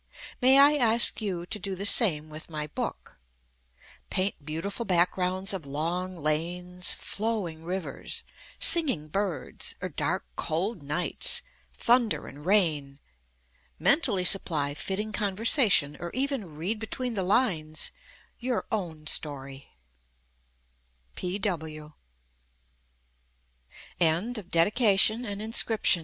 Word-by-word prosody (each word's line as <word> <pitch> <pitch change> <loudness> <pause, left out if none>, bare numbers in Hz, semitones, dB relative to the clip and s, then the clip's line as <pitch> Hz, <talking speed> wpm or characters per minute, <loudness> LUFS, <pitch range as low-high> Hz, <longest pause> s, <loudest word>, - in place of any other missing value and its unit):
May 260 +2 +7
I 285 +2 +7
ask 235 -2 +3
you 180 -5 -3
to 210 - -3
do 195 0 -4
the 195 +2 -5
same 155 -9 +5
with 155 +2 -10
my 150 -2 -4
book 150 - -6 0.4
— - - -27
paint 185 -5 -2
beautiful 165 +9 -4
backgrounds 185 0 +1
of 190 -4 -5
long 175 +6 -3
lanes* 155 +3 -1
[viii] 180 0 -15
INSCRIPTION 180 +2 0
flowing 200 -7 -3
rivers, 180 +1 -4 0.3
singing 275 - +4
birds, 195 -1 -3
or - - -4
dark - - -2
cold 180 +4 -2
nights, 150 +5 0 0.3
thunder 240 -2 +2
and 150 +4 -11
rain, 155 -9 +1 0.8
mentally 245 - +2
supply 155 -7 +1
fit 170 +6 -2
ting 215 +2 -4
conversation 205 - +2
or 175 - -5
even 260 - -2
read 190 +8 -3
between 245 +2 -3
the 200 - -2
lines 180 -7 +1 0.5
your 250 -1 -2
own 165 -8 -4
sto 145 -3 +2
185 Hz, 105 wpm, -27 LUFS, 155-220 Hz, 0.8 s, May